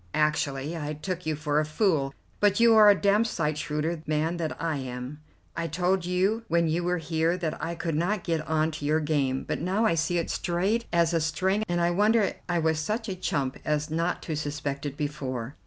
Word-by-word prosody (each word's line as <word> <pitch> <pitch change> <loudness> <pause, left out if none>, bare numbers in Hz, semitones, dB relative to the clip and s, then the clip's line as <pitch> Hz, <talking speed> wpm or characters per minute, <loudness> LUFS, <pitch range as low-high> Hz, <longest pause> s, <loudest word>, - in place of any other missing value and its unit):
Actually 150 0 0
I 150 -2 -3
took 175 +2 -5
you 155 - 0
for 150 0 0
a - - +2
fool, 155 -3 +1 0.3
but 205 0 +3
you 230 0 +6
are 215 -1 +8
a 205 - +7
damned 210 +3 +3
sight 155 -8 -1
shrewder 155 +1 -2
man 155 +3 0
than 160 -2 -2
I 160 -1 -2
am. 130 +2 -6 0.4
I 165 0 -2
told 180 +2 0
you 195 +5 +1
when 170 0 +2
you 165 +2 0
were 180 +1 +1
here 160 +1 0
that 165 -4 -3
I 170 +1 -2
could 165 -1 -3
not 175 +6 0
get 165 -2 0
on 155 0 +1
to 150 -1 -6
your 155 +2 +2
game, 140 -4 0
but - - -3
now 190 +6 +1
I 220 - +3
see 165 +2 0
it 170 - -1
straight 195 +7 0
as 170 -1 +2
a 165 - +2
string, 185 +7 0
and 175 0 +1
I 170 0 +2
wonder 210 +3 +3 0.2
I 175 - +1
was 160 -1 +1
such 215 +7 -2
a 190 - -2
chump 140 -7 -2
as 150 0 -1
not 165 +2 -1
to 160 - -3
suspect 145 -1 -3
it 145 0 -7
before. 135 -4 -4
165 Hz, 220 wpm, -27 LUFS, 150-180 Hz, 0.4 s, are